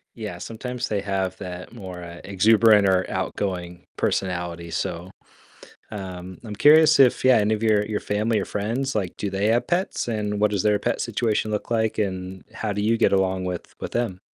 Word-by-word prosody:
Yeah, 105 -6 -6
sometimes 125 +5 -5
they 105 -2 -1
have 95 -1 -2
that 90 0 -7
more, 95 -6 -8
uh, 85 0 -9
exuberant 105 +2 +5
or 95 -1 +2
outgoing 90 -3 -3
personality, 85 -2 -2
so, 85 +2 -3 0.8
um, 95 -3 -7
I'm 105 -3 -7
curious 155 +4 +6
if 130 -3 +5
yeah, 130 -1 +6
any 105 0 +2
of 110 +1 -1
your 105 -2 +3
your 105 0 -3
family 105 +1 0
or - - -2
friends, 115 +6 -2
like, 95 -5 -2
do 105 - -2
they 100 +1 -1
have 115 +2 +2
pets, 175 -7 -1
and 105 -2 -2
what 105 0 +3
does 100 -3 0
their 105 -1 +3
pet 120 +2 -1
situation 110 -2 -1
look 105 +1 -3
like, 110 -2 0
and 95 -2 -3
how 105 -2 -2
do 105 - -3
you 110 +3 +2
get 115 - +3
along 95 -1 +1
with 90 -1 -5
with - - -6
them? 115 -6 -2
105 Hz, 190 wpm, -24 LUFS, 95-110 Hz, 0.8 s, curious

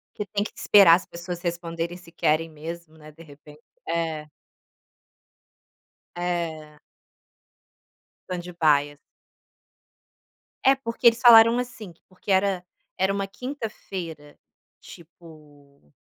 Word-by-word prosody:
Que 210 - -4
tem 205 +1 -1
que - - -7
esperar 195 -5 +6
as 180 - -4
pessoas 170 0 -7
responderem 170 0 -4
se 175 -2 -17
querem 160 0 +1
mesmo, 160 +1 -9
né, 155 0 -13
de 165 +2 -15
repente. 150 0 -16 0.3
É. 160 -2 -2 1.9
É. 165 -4 -4 1.5
Stand 180 -1 -6
by. 145 -2 +2 1.7
É, 270 +1 +6
porque 235 -3 0
eles 230 0 +5
falaram, 230 0 +7
assim, 240 -6 -7
que 165 - -25
porque 185 +2 -7
era 190 -1 +1 0.3
era 190 +1 +1
uma 195 0 -2
quinta-feira, 195 - -7 0.4
tipo 150 - -17
170 Hz, 110 wpm, -24 LUFS, 155-195 Hz, 1.9 s, falaram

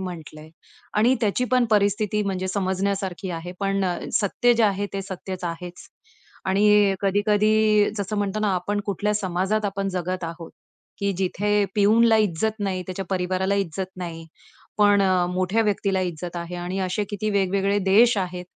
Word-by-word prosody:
म्हटलंय 160 -4 -8 0.5
आणि 240 +5 +4
त्याची 220 +3 +1
पण 250 -1 +4
परिस्थिती 210 0 +2
म्हणजे 185 -2 -2
समजण्यासारखी 190 -1 -2
आहे. 170 +1 -6
पण 195 -1 0
अ, 180 -1 0 0.2
सत्य 240 +4 +2
जे 230 - +2
आहे 205 -1 +1
ते 195 - -3
सत्यच 190 -1 -7
आहेच. 175 +1 -7 0.6
आणि 205 +1 +4
कधी-कधी 210 +1 +3
जसं 205 +1 -3
म्हणतो 205 +1 -1
ना 210 - +1
आपण 205 +3 -1
कुठल्या 205 +1 -1
समाजात 195 +2 -1
आपण 195 -1 -2
जगत 185 -1 -3
आहोत 165 0 -7 0.5
की 200 0 0
जिथे 205 +2 +1
पिऊनला 220 +2 +4
इज्जत 215 +1 0
नाही, 190 -2 -2
त्याच्या 190 +1 -5
परिवाराला 185 +1 0
इज्जत 190 -1 -2
नाही, 165 -2 -7 0.5
पण 205 -1 +5
अ, 185 -2 +2
मोठ्या 185 +5 +1
व्यक्तीला 200 -2 0
इज्जत 175 -1 -4
आहे 170 +1 -5
आणि 180 +2 -4
असे 185 +2 -1
किती 210 +1 -2
वेगवेगळे 200 0 +1
देश 230 +3 +6
आहेत 180 -1 -4
195 Hz, 155 wpm, -23 LUFS, 185-210 Hz, 0.6 s, देश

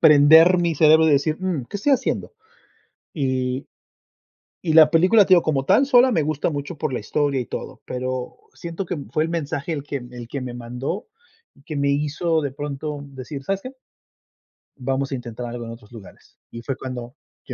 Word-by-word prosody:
prender 160 +4 +7
mi 170 -2 +1
cerebro 160 +1 +5
y - - +4
decir: 155 +3 +2
"Mm, 180 -8 -2
¿qué - - -4
estoy 275 +8 +1
haciendo?" 265 - -1 0.8
Y 130 -2 -2 1.0
y 165 -3 0
la 155 -1 +7
película, 185 +6 +5
te - - -17
digo, 175 - +4
como 140 -4 0
tal, 270 - +4
sola 255 -1 +5
me 165 -9 +1
gusta 155 +2 -1
mucho 145 +2 -5
por 145 -2 -3
la - - -1
historia 145 -2 -1
y 125 - -4
todo, - - -7
pero 130 0 -4 0.2
siento 170 +3 -6
que, 180 - -4
em, 145 -4 -8
fue 155 - +1
el 160 - -1
mensaje 160 -1 -3
el 145 -3 -4
que 145 - -4
el 120 -1 -9
que 140 - -5
me 125 -1 -6
mandó 125 - -5 0.5
y 140 - -23
que 155 +1 -6
me 140 0 +1
hizo 150 +3 0
de 145 -2 -3
pronto 145 +1 -5
decir: 135 +1 -8
"¿Sabes 195 +3 -1
qué?" 255 - -7 1.1
"vamos 135 +2 -2
a - - -1
intentar 120 -1 -7
algo 120 0 -6
en 115 - -7
otros 115 -1 -13
lugares", 110 -5 -14
y 115 - -8
fue 135 +3 -3
cuando 125 -1 -7 0.3
y - - -6
145 Hz, 200 wpm, -22 LUFS, 130-165 Hz, 1.1 s, prender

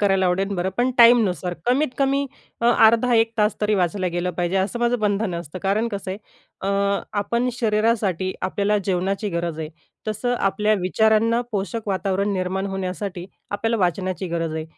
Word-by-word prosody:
करायला 195 -2 +3
आवडेल 185 +2 +1
बरं, 180 0 -1
पण 250 +1 +2
टाईमनुसार 220 -7 +5
कमीत 270 +5 +2
कमी 275 0 +1 0.3
अ, 235 - +2 0.2
अर्धा-1 230 0 +3
तास 210 0 +3
तरी 210 0 +2
वाचायला 185 0 0
गेलं 180 +1 -1
पाहिजे, 175 +2 -1
असं 195 +5 0
माझं 240 +1 +1
बंधन 205 -2 0
असतं. 170 0 -6
कारण 210 +4 +1
कसं 200 -3 -5
आहे, 190 - -5 0.4
अ, 200 +1 0 0.2
आपण 235 +5 0
शरीरासाठी 210 -5 +1
आपल्याला 205 +2 +1
जेवणाची 195 +2 -1
गरज 170 -2 -3
आहे, 155 -1 -4 0.4
तसं 220 +4 -1
आपल्या 210 +2 +2
विचारांना 220 +5 +2
पोषक 210 +2 -3
वातावरण 195 +1 0
निर्माण 190 +1 -2
होण्यासाठी 185 -1 -4 0.2
आपल्याला 225 +3 0
वाचण्याची 185 +1 -1
गरज 165 -1 -2
आहे. 160 0 -3
200 Hz, 160 wpm, -22 LUFS, 185-220 Hz, 0.4 s, टाईमनुसार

